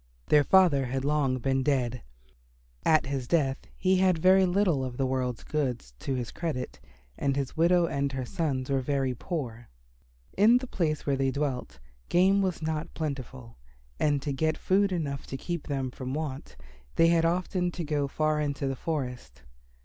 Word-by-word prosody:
Their 150 Hz, -1 st, +6 dB
father 150 Hz, -6 st, +4 dB
had 135 Hz, +2 st, -2 dB
long 145 Hz, -3 st, +1 dB
been 135 Hz, +1 st, 0 dB
dead. 125 Hz, -3 st, 0 dB, 0.8 s
At 155 Hz, -1 st, +4 dB
his 135 Hz, -2 st, -3 dB
death 135 Hz, -3 st, 0 dB
he 185 Hz, 0 st, +2 dB
had 185 Hz, -3 st, +2 dB
little 185 Hz, -5 st, +4 dB
of 125 Hz, -1 st, -5 dB
the 135 Hz, -, +1 dB
world's 130 Hz, -2 st, -2 dB
goods 125 Hz, -, -2 dB
to 135 Hz, -, -2 dB
his 120 Hz, -3 st, -4 dB
credit 155 Hz, -7 st, -4 dB, 0.4 s
and 140 Hz, -1 st, +1 dB
his 135 Hz, -2 st, -3 dB
widow 170 Hz, +2 st, +4 dB
and 140 Hz, -3 st, -1 dB
her 130 Hz, -1 st, -3 dB
sons 135 Hz, -2 st, -2 dB
were 135 Hz, -1 st, +2 dB
very 135 Hz, -1 st, 0 dB
poor. 120 Hz, -5 st, -5 dB, 0.7 s
In 220 Hz, +5 st, +6 dB
the 255 Hz, -, -4 dB
place 160 Hz, -, -1 dB
where 140 Hz, -, +1 dB
they 135 Hz, 0 st, +1 dB
dwelt, 130 Hz, -, -3 dB, 0.3 s
game 190 Hz, +3 st, +4 dB
was 185 Hz, -4 st, -1 dB
not 155 Hz, 0 st, -3 dB
plentiful, 130 Hz, -6 st, -5 dB, 0.4 s
and 145 Hz, -2 st, +1 dB
to 145 Hz, -, -2 dB
get 155 Hz, +3 st, 0 dB
food 195 Hz, +1 st, +2 dB
enough 145 Hz, -6 st, -3 dB
to 135 Hz, -, -5 dB
keep 170 Hz, +2 st, -5 dB
them 135 Hz, -3 st, -2 dB
from 130 Hz, +1 st, -5 dB
want 145 Hz, -, -5 dB, 0.4 s
they 165 Hz, 0 st, +5 dB
had 170 Hz, -1 st, +3 dB
often 180 Hz, +1 st, 0 dB
to 175 Hz, 0 st, -5 dB
go 145 Hz, -2 st, 0 dB
far 155 Hz, +2 st, 0 dB
into 145 Hz, -1 st, -2 dB
the 135 Hz, -, -1 dB
forest. 125 Hz, -, -5 dB
145 Hz, 170 wpm, -28 LUFS, 130-165 Hz, 0.8 s, Their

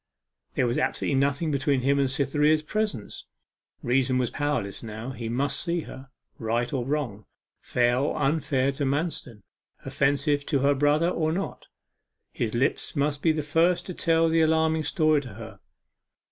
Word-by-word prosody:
There 130 Hz, -, +2 dB
was 120 Hz, 0 st, 0 dB
absolutely -, -, -1 dB
nothing 145 Hz, +3 st, 0 dB
between 140 Hz, -1 st, +1 dB
him 140 Hz, +2 st, +2 dB
and 135 Hz, -1 st, +2 dB
Cytherea's 150 Hz, +3 st, +2 dB
presence. 210 Hz, -, -3 dB, 0.6 s
Reason 130 Hz, +1 st, +2 dB
was 125 Hz, -2 st, 0 dB
powerless 145 Hz, -10 st, -2 dB
now; 110 Hz, +2 st, -6 dB
he 120 Hz, -3 st, -5 dB
must 135 Hz, +5 st, 0 dB
see 170 Hz, -1 st, -1 dB
her 135 Hz, -2 st, -11 dB, 0.3 s
right 120 Hz, +3 st, -1 dB
or 130 Hz, -3 st, 0 dB
wrong, 125 Hz, -7 st, -3 dB, 0.3 s
fair 120 Hz, 0 st, +1 dB
or 140 Hz, -, -1 dB
unfair 140 Hz, -2 st, +1 dB
to 140 Hz, +1 st, -4 dB
Manston 140 Hz, -, -2 dB, 0.4 s
offensive 145 Hz, +1 st, +1 dB
to 140 Hz, -4 st, +1 dB
her 140 Hz, +1 st, +4 dB
brother 145 Hz, +4 st, +2 dB
or 160 Hz, -3 st, 0 dB
no. 195 Hz, +4 st, -3 dB, 0.7 s
His 115 Hz, -1 st, -2 dB
lips 130 Hz, +6 st, -1 dB
must 145 Hz, 0 st, 0 dB
be 165 Hz, -, +3 dB
the 155 Hz, -1 st, -2 dB
first 165 Hz, +4 st, +2 dB
to 180 Hz, -, -6 dB
tell 165 Hz, -1 st, +2 dB
the 165 Hz, 0 st, +3 dB
alarming 160 Hz, 0 st, +2 dB
story 155 Hz, -1 st, +2 dB
to 125 Hz, -7 st, -10 dB
her. 110 Hz, -3 st, -10 dB
140 Hz, 160 wpm, -26 LUFS, 125-155 Hz, 0.7 s, her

